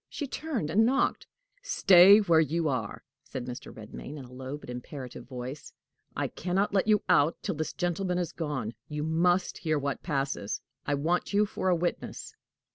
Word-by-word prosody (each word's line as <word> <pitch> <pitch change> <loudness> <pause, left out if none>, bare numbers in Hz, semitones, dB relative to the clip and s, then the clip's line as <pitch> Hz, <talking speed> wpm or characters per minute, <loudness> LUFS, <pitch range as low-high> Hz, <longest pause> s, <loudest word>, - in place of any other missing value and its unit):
She 295 - -4
turned, 270 - -3
and 215 +6 +4
knocked. 260 +4 +1 0.3
"Stay 195 - +7
where 170 -5 +4
you 160 +1 +1
are," 125 -7 -3 0.2
said 125 - -6
Mr. 125 -1 -7
Redmain, 110 +7 -9
in 135 - -8
a 125 - -15
low 130 +2 -6
but - - -14
imperative 125 0 -8
voice. 130 +3 -7 0.4
"I - - 0
can 180 +1 -4
not 200 +2 +2
let 195 +1 +2
you 210 -2 +4
out 150 +4 +4
till - - -1
this 155 0 -3
gentleman 180 0 -1
is 175 -2 -1
gone. 145 -10 -3
You 150 0 -4
must 175 +3 +1
hear 155 -2 0
what 140 -1 -2
passes: 135 - -2 0.3
I 145 - +2
want 170 +7 0
you 205 +1 +4
for 195 -2 -2
a 180 - +4
witness." 175 +1 -3
160 Hz, 185 wpm, -29 LUFS, 135-185 Hz, 0.4 s, Stay